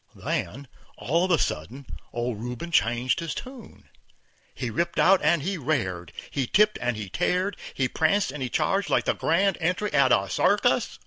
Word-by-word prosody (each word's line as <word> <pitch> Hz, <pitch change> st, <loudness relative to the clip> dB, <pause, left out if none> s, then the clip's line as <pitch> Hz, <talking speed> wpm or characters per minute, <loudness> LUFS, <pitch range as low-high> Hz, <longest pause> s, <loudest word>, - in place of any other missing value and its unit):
Then, 140 Hz, +2 st, -4 dB, 0.3 s
all 165 Hz, +7 st, +1 dB
of -, -, -3 dB
a 170 Hz, -, +4 dB
sudden, 125 Hz, -, -3 dB, 0.3 s
old 120 Hz, -2 st, -3 dB
Rubin 125 Hz, +8 st, -6 dB
changed 120 Hz, -3 st, +2 dB
his 165 Hz, -2 st, -4 dB
tune. 255 Hz, -4 st, -10 dB, 0.7 s
He 125 Hz, -3 st, -4 dB
ripped 170 Hz, +9 st, -2 dB
out 195 Hz, 0 st, +5 dB
and 155 Hz, -1 st, +3 dB
he 190 Hz, +1 st, -2 dB
rared, 95 Hz, -, -2 dB, 0.2 s
he 135 Hz, -3 st, -1 dB
tipped 210 Hz, -, +3 dB
and 125 Hz, -2 st, -1 dB
he 105 Hz, -2 st, -5 dB
tared, 180 Hz, -, 0 dB, 0.2 s
he 130 Hz, -, +1 dB
pranced 160 Hz, +7 st, +1 dB
and 145 Hz, 0 st, -7 dB
he 130 Hz, -, -2 dB
charged 195 Hz, +10 st, 0 dB
like -, -, +2 dB
the -, -, +2 dB
grand 190 Hz, +4 st, +1 dB
entry 180 Hz, +5 st, -1 dB
at 135 Hz, -2 st, +4 dB
a 95 Hz, -, +3 dB
circus. 90 Hz, -, +1 dB
145 Hz, 180 wpm, -25 LUFS, 120-180 Hz, 0.7 s, out